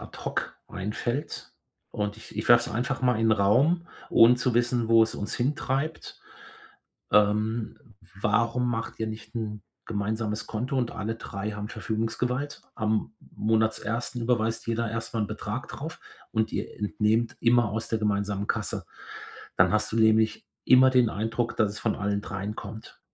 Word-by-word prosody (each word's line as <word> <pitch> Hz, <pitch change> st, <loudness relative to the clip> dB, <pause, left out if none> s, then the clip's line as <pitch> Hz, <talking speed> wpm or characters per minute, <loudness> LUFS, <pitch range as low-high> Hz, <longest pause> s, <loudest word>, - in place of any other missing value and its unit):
ad -, -, -10 dB
hoc -, -, -3 dB
einfällt, 110 Hz, +8 st, -4 dB, 0.4 s
und 105 Hz, 0 st, -2 dB
ich 110 Hz, -, -12 dB
ich 110 Hz, -, -3 dB
werfe 120 Hz, 0 st, +6 dB
es -, -, -6 dB
einfach 125 Hz, +3 st, -1 dB
mal 125 Hz, -3 st, +3 dB
in 115 Hz, -, +3 dB
'n -, -, +6 dB
Raum, 130 Hz, -, +3 dB, 0.2 s
ohne 115 Hz, +2 st, +7 dB
zu 125 Hz, -1 st, 0 dB
wissen, 120 Hz, -1 st, +1 dB
wo 115 Hz, -1 st, +7 dB
es 110 Hz, -, 0 dB
uns 105 Hz, -, -4 dB
hintreibt. 140 Hz, +3 st, -2 dB, 0.9 s
Ähm, 105 Hz, +2 st, +2 dB, 0.4 s
warum 115 Hz, +4 st, +2 dB
macht 115 Hz, -1 st, -3 dB
ihr 110 Hz, -, 0 dB
nicht 110 Hz, 0 st, -8 dB
'n 105 Hz, -2 st, -4 dB, 0.2 s
gemeinsames 105 Hz, +1 st, -2 dB
Konto 125 Hz, +5 st, -2 dB
und 120 Hz, -2 st, 0 dB
alle 110 Hz, +2 st, -3 dB
3 105 Hz, -1 st, -5 dB
haben 105 Hz, 0 st, -5 dB
Verfügungsgewalt? 120 Hz, +6 st, -2 dB
Am 110 Hz, 0 st, -1 dB, 0.2 s
Monatsersten 110 Hz, +2 st, 0 dB
überweist 115 Hz, -1 st, 0 dB
jeder 115 Hz, 0 st, -1 dB
erst 115 Hz, +1 st, -4 dB
mal 115 Hz, -, 0 dB
'n 105 Hz, -, +1 dB
Betrag 105 Hz, +3 st, -5 dB
drauf 160 Hz, +3 st, -7 dB, 0.3 s
und 110 Hz, -1 st, 0 dB
ihr -, -, -4 dB
entnehmt 105 Hz, +2 st, +1 dB
immer 120 Hz, -2 st, +4 dB
aus 110 Hz, +2 st, -3 dB
der 115 Hz, -, 0 dB
gemeinsamen 100 Hz, -1 st, 0 dB
Kasse. -, -, -2 dB, 0.7 s
Dann -, -, +5 dB
hast 105 Hz, 0 st, +1 dB
du -, -, -1 dB
nämlich 110 Hz, -1 st, +3 dB, 0.2 s
immer 130 Hz, +1 st, +7 dB
den 125 Hz, -3 st, +4 dB
Eindruck, 115 Hz, +3 st, -2 dB
dass 110 Hz, -3 st, +2 dB
es 105 Hz, -, -7 dB
von 110 Hz, -, +1 dB
allen 100 Hz, 0 st, -1 dB
3 100 Hz, +2 st, -5 dB
kommt. 110 Hz, +1 st, -9 dB
110 Hz, 165 wpm, -27 LUFS, 105-120 Hz, 0.9 s, ohne